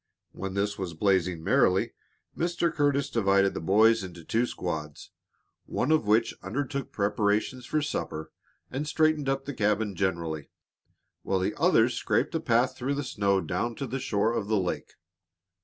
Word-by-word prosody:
When 95 0 -6
this 100 +1 -1
was 90 -4 -4
blazing 90 -2 +1
merrily, - - +3 0.4
Mr. 170 0 0
Curtis 140 -2 +1
divided 100 -5 +2
the - - -4
boys 110 +5 +4
into 90 -2 -9
two 115 +8 +1
squads, 75 -8 -5 0.6
one 135 - 0
of 155 -9 +3
which 110 +2 +3
undertook 135 +5 -3
preparations 105 +4 0
for 155 -1 0
supper 80 - -4 0.4
and 145 +4 -3
straightened 155 -2 +2
up 135 0 -1
the 145 - -4
cabin 105 -2 0
generally, 85 -5 -2 0.7
while 95 - 0
the 95 - 0
others - - +4
scraped - - 0
a - - +1
path 120 +2 +2
through 135 +3 -2
the 145 - -2
snow 100 -6 +1
down 120 +4 -2
to 140 - -4
the 135 +1 -3
shore 110 -1 0
of 105 -4 -2
the 110 0 +2
lake. 90 -2 -3
105 Hz, 160 wpm, -28 LUFS, 95-135 Hz, 0.7 s, boys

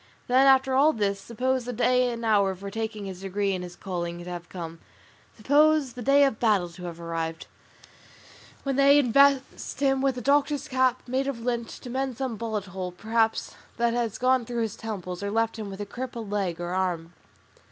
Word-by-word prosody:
Then, 260 +2 +4
after 265 0 +5
all 290 +4 +5
this, 200 -2 -1
suppose 250 +3 -1
the 250 - -3
day 250 +2 +3
and 230 -1 -5
hour 200 -3 +3
for 200 +2 -8
taking 220 -1 -4
his 190 -1 -7
degree 195 +1 -1
in 185 - -3
his 175 -1 -8
calling 175 -3 -4
to 180 - -8
have 175 -1 -7
come; 165 -2 -7 0.6
suppose 290 +2 +3
the 250 - -8
day 280 +4 +5
of 270 -6 +1
battle 205 -7 +2
to 180 +1 -10
have 170 -1 -7
arrived, 165 -1 -4 1.2
when 275 -1 -1
they 280 +1 +6
invest 275 +1 +3
him 270 -1 +2
with 270 -2 +1
the 250 - -5
doctor's 285 +2 +2
cap 255 -2 +1
made 260 +2 0
of 260 -4 -3
lint, 235 -1 -2
to 250 - -9
mend 260 -1 -2
some 260 -4 -2
bullet 220 -2 -3
hole, 185 -1 -5
perhaps, 220 +4 0 0.2
that 235 -1 +2
has 235 -3 -1
gone 255 0 +3
through 235 0 -2
his 220 -1 -3
temples, 185 -5 -6
or 200 - -2
left 225 +1 0
him 210 -2 -5
with 195 0 -8
a 205 - -3
crippled 230 -1 -6
arm 175 -4 -2
or 185 -1 0
leg. 165 +1 -16
225 Hz, 200 wpm, -26 LUFS, 195-260 Hz, 1.2 s, they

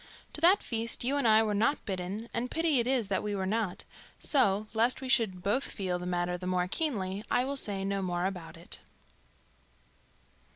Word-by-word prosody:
To 305 - -6
that 365 +5 +6
feast 230 0 -2
you 265 +4 +1
and 280 - +2
I 220 0 +6
were 215 -1 0
not 225 +8 +1
bidden, 195 +3 -4
and 245 +2 -2
pity 320 -3 +2
it 235 - 0
is 255 -5 +1
that 190 - +1
we 210 -1 -2
were 190 -1 -2
not; 210 -2 -1 0.3
so, 215 -7 +2
lest 230 +3 +3
we 265 - -6
should 215 -8 +2
both 240 +7 +1
feel 185 -3 -3
the 180 - -5
matter 175 0 -1
the 180 - -5
more 180 -1 +1
keenly, 200 - -2
I 250 - +2
will 280 +1 -2
say 200 -7 -2
no 195 0 -1
more 175 -1 -1
about 180 -4 -5
it. 170 - -6
210 Hz, 200 wpm, -30 LUFS, 185-245 Hz, 0.3 s, that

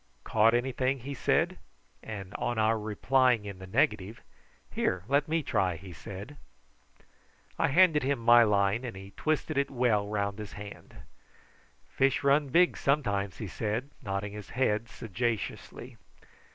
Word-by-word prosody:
"Caught 110 +2 +3
anything?" 130 +1 0
he 140 +4 -6
said; 135 - +1 0.4
and 100 -3 -7
on 120 - -2
our 110 +1 +2
replying 120 +2 +2
in 100 -2 -7
the 95 - -9
negative, 105 +2 0 0.5
"Here, 90 -1 -1
let 140 +3 +2
me 160 0 0
try," 95 -8 0
he 90 +2 -10
said. 100 - -9 1.2
I - - +3
handed 160 0 +5
him 140 +1 0
my 120 +1 +6
line, 105 +1 +2
and 120 -6 -6
he 95 +1 -10
twisted 155 +4 -1
it 140 - 0
well 120 -5 +1
round 100 0 -2
his 105 -1 -7
hand. 100 0 -10 0.9
"Fish 135 +1 +1
run 140 +1 +3
big, 175 +6 +4
sometimes," 100 -9 0
he 110 - -5
said, 110 +8 -3
nodding 100 +1 -4
his 105 -2 -9
head 115 -3 +1
sagaciously. 115 0 -4
110 Hz, 145 wpm, -29 LUFS, 100-135 Hz, 1.2 s, my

